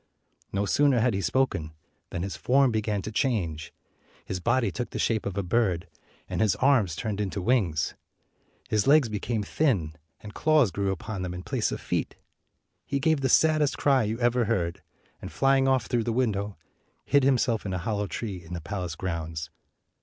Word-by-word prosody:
No 100 +1 0
sooner 140 +4 +3
had 120 +1 +2
he 95 - -1
spoken 85 -6 0 0.4
than 90 -1 -4
his 95 - -4
form 135 0 +3
began 105 -3 -1
to 110 - -5
change. 90 - -1 0.5
His 95 - -4
body 115 +1 +1
took 120 +6 -4
the - - -6
shape 110 -3 0
of 100 0 -5
a 100 - 0
bird, 90 -3 0 0.4
and - - -2
his 105 -3 +3
arms 110 - +3
turned 105 -1 -3
into 100 0 -3
wings. 90 -7 +1 0.7
His 105 +1 +1
legs 145 -4 +5
be 105 -1 -3
came 110 0 -2
thin, 100 - 0 0.3
and 105 -1 -10
claws 155 - +3
grew 100 +3 -1
upon 100 +2 -5
them 90 -1 -4
in 90 - -7
place - - -1
of - - -3
feet. - - -2 0.7
He 140 - -2
gave 155 0 +2
the 135 - +1
saddest 155 0 +3
cry 135 -2 +3
you 110 +1 -2
ever 120 0 +2
heard, 90 -7 -1 0.4
and, - - -7
flying 135 0 +3
off 130 -3 +2
through 120 -2 0
the 115 - 0
window, 105 -5 -1 0.5
hid 140 - +4
himself 125 -4 +2
in 100 - -4
a 95 - -1
hollow 105 +3 -2
tree 95 -4 -5
in 85 +2 -7
the 85 - -5
palace 90 -1 -4
grounds. 80 -3 -4
105 Hz, 190 wpm, -27 LUFS, 95-130 Hz, 0.7 s, legs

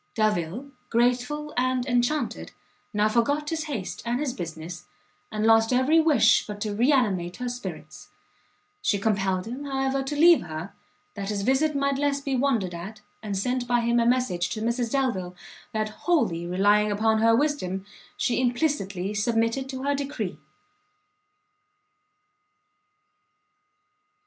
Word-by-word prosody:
Delvile, 215 - -1 0.2
grateful 250 +6 0
and 255 0 +1
enchanted, 245 +4 -1 0.4
now 210 0 +2
forgot 285 +7 +1
his 320 -1 -2
haste 235 - -5
and 240 +1 -1
his 285 -4 -2
business, 165 -1 -7 0.4
and 215 0 -1
lost 225 +1 +5
every 260 +6 +4
wish 305 -9 +4
but 205 -1 -6
to 210 -1 -2
re 240 +7 +3
animate 190 -10 +1
her 250 - -4
spirits: 245 0 -7 0.7
she 210 - +1
compelled 195 -3 0
him, 255 +5 -6
however, 270 0 -1
to 270 +2 -4
leave 335 +3 +6
her, 160 +2 -7 0.4
that 200 -1 -5
his 205 -2 -2
visit 280 +6 +2
might 280 0 0
less 285 -1 +1
be 275 -1 -2
wondered 240 -9 +1
at, 195 +6 -8 0.2
and 205 -3 -3
sent 250 +4 -1
by 240 0 +2
him 235 +1 +2
a 230 - +2
message 210 -9 +1
to 215 - -4
Mrs. 235 +1 -1
Delvile, 200 -10 -1 0.4
that, 215 -1 -1
wholly 215 - 0
relying 205 +4 +3
upon 220 +2 +2
her 225 0 +5
wisdom, 215 -10 -1 0.3
she 245 - +1
implicitly 240 - -1
submitted 230 +5 0
to 260 -1 -5
her 285 +1 +1
decree. 280 0 -4
235 Hz, 140 wpm, -26 LUFS, 205-270 Hz, 0.7 s, leave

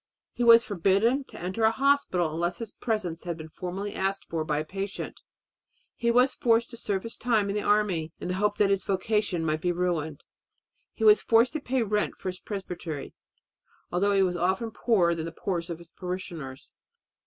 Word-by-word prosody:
He 245 - -2
was 230 0 +8
forbidden 205 +7 +2
to - - -12
enter 185 +6 -3
a 220 - +7
hospital 225 - +2
unless 175 +2 -1
his 225 -3 -6
presence 195 -8 -3
had 170 -2 -3
been 160 -1 -9
formally 190 +5 -5
asked 195 +1 -2
for 165 -1 -2
by 150 -1 -1
a 155 - -2
patient. 195 +3 -5 0.7
He 235 - 0
was 250 +3 +4
forced 230 0 +2
to 235 - -7
serve 200 -4 -2
his 230 - -5
time 220 -4 +1
in - - -3
the 210 - 0
army 200 -7 +1
in - - -5
the 180 - -1
hope 205 +2 0
that 200 -1 +3
his 195 -1 +1
vocation 195 -3 0
might 155 0 0
be 180 - +1
ruined. 170 -4 -2 0.7
He 225 - -4
was 215 -1 +7
forced 230 +2 +4
to 310 - -1
pay 260 -1 0
a - - +1
rent 210 0 0
for 185 - -4
his 185 0 -6
presbytery, 175 -7 -6 0.8
although 200 +3 +2
he 195 -1 +4
was 180 -1 0
often 190 +6 0
poorer 195 -7 +2
than 165 -1 -4
the 165 - -5
poorest 170 0 -3
of 170 - -4
his 170 -1 -16
parishioners. 170 -7 -6
195 Hz, 200 wpm, -27 LUFS, 170-220 Hz, 0.8 s, was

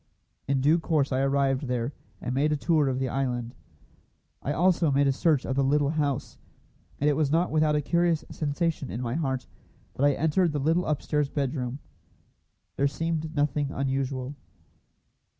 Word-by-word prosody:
In 135 -1 +1
due 155 +5 +4
course 155 -4 0
I 130 - +1
arrived 135 0 +1
there, 125 +2 -2 0.3
and 125 - -3
made 145 +4 +2
a - - +2
tour 155 -1 +2
of 130 - -1
the 130 0 -1
island. 125 -2 -2 0.9
I 145 - -2
also 170 +1 +3
made 140 +1 +3
a 140 - +4
search 145 0 +1
of 130 - -2
the 140 - +2
little 145 +1 +2
house, 145 -4 -2 0.6
and 145 - +1
it 150 - +4
was 145 -1 +1
not 165 +4 +2
without 155 -1 +3
a 150 - +2
curious 170 0 +1
sensation 155 -1 -2
in 115 - -4
my 120 -1 -2
heart 135 -4 -1 0.5
that 135 - -2
I 145 0 +5
entered 160 +3 +1
the 145 - -1
little 165 +6 +1
upstairs 150 -1 0
bedroom. 135 -3 -2 1.0
There 140 - +3
seemed 160 +1 -3
nothing 145 -1 +1
unusual. 135 -1 -2
145 Hz, 170 wpm, -27 LUFS, 135-155 Hz, 1.0 s, I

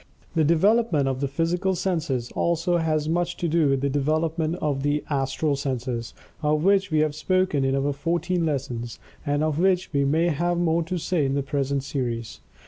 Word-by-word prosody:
The 160 -2 +2
development 170 -1 +3
of 130 0 -2
the 140 - +1
physical 175 +6 0
senses, 150 -10 -2
also 170 +1 +1
has 155 -2 0
much 175 +2 -1
to 175 - -1
do 160 -2 +2
with 135 -1 +1
the 140 - +1
development 155 +3 0
of 145 -6 -1
the 145 +1 0
"Astral 140 +2 0
Senses," 125 -4 -3 0.3
of 150 0 +1
which 195 0 +3
we 155 -2 +2
have 155 -1 +1
spoken 185 -2 +1
in 135 0 +1
our 140 +1 0
"Fourteen 170 +4 -1
Lessons," 130 -6 -3 0.3
and 145 +1 +1
of 155 -1 0
which 185 -1 +1
we 140 -1 +2
may 160 +5 +2
have 175 +3 0
more 170 -1 +2
to 170 +2 -3
say 170 -1 0
in 135 0 0
the 140 - 0
present 140 -1 -1
series. 120 -5 -4
155 Hz, 190 wpm, -24 LUFS, 140-170 Hz, 0.3 s, development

